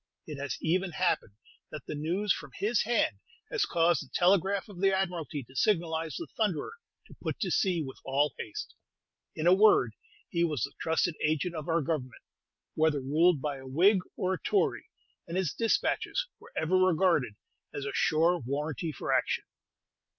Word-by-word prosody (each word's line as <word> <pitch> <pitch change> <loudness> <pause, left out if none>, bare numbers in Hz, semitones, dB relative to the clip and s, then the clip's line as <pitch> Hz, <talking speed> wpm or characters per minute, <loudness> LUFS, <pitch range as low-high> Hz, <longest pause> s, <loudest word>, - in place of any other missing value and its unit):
It 150 -3 -7
has 140 0 -3
even 180 +2 0
happened 170 - 0 0.3
that 150 - -8
the - - -5
news 170 +6 0
from 145 - -8
his 215 +2 +1
hand 210 - +1 0.3
has - - +1
caused 170 -1 +2
the 135 - -17
telegraph 195 +3 +2
of 190 -4 -10
the 195 0 +4
Admiralty 175 -6 -2
to 130 +3 -19
signalize 165 -3 +1
the 335 - -4
"Thunderer" 210 - -1 0.3
to - - -15
put - - -3
to - - 0
sea 180 -5 +1
with 130 -2 -9
all 140 +1 +1
haste. 105 - -6 0.6
In 155 - -3
a 175 - +7
word, 190 - +5 0.4
he 170 -1 +1
was 150 -9 0
the - - -3
trusted 165 +2 +1
agent 155 +3 0
of 155 0 -6
our 165 -1 +2
Government, 130 -4 -3 0.5
whether 155 -2 +2
ruled 150 +3 +3
by 145 -2 -2
a 130 0 -11
Whig 185 +9 +4 0.2
or 185 0 0
a - - -4
Tory, 405 - 0 0.4
and 170 +2 -3
his 185 -6 0
despatches 230 - 0
were - - -16
ever 170 +4 +2
regarded 175 - +3 0.4
as 140 - -5
a 140 - -3
sure 165 +3 +3
warranty 150 +5 -3
for - - -2
action. - - +1
165 Hz, 175 wpm, -30 LUFS, 145-185 Hz, 0.6 s, a